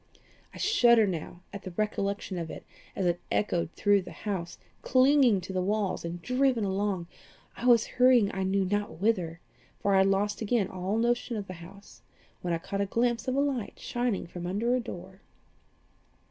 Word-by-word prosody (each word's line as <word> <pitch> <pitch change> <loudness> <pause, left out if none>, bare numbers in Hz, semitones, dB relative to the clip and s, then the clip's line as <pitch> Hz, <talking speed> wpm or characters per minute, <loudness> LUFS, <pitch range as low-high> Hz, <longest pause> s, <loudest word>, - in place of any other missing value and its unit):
I - - -12
shudder 240 - +5
now 175 -1 -5
at 200 - -6
the 190 - -7
recollection 200 -3 -2
of 165 -1 -5
it - - -9 0.3
as 190 - -1
it 175 0 0
echoed 175 -5 0
through 205 -1 +3
the 185 - -10
house, 185 -5 -3 0.2
clinging 255 -5 +4
to 185 +2 -7
the 185 - 0
walls 200 +1 -1
and 170 +1 -5
driven 250 -2 +2
along. 195 -2 -1 0.5
I 245 - -3
was 235 -2 +6
hurrying 250 -5 +4
I 190 - -3
knew 190 +1 +1
not 205 -3 -2
whither, 180 -5 0 0.4
for 200 - +1
I - - +5
had - - +2 0.3
again 220 -2 +1
lost - - -11
all 185 +4 -1
notion 240 0 0
of 205 - -4
the 185 - -7
house, 200 +4 -14 0.4
when 175 - -2
I 170 - +1
caught 195 +4 -4
a 200 - 0
glimpse 235 +3 0
of 255 - 0
a - - +2
light 270 -6 -2
shining 240 -4 -2
from 175 +1 -7
under 220 +7 0
a 255 - +2
door. 190 -4 -9
200 Hz, 190 wpm, -28 LUFS, 185-235 Hz, 0.5 s, was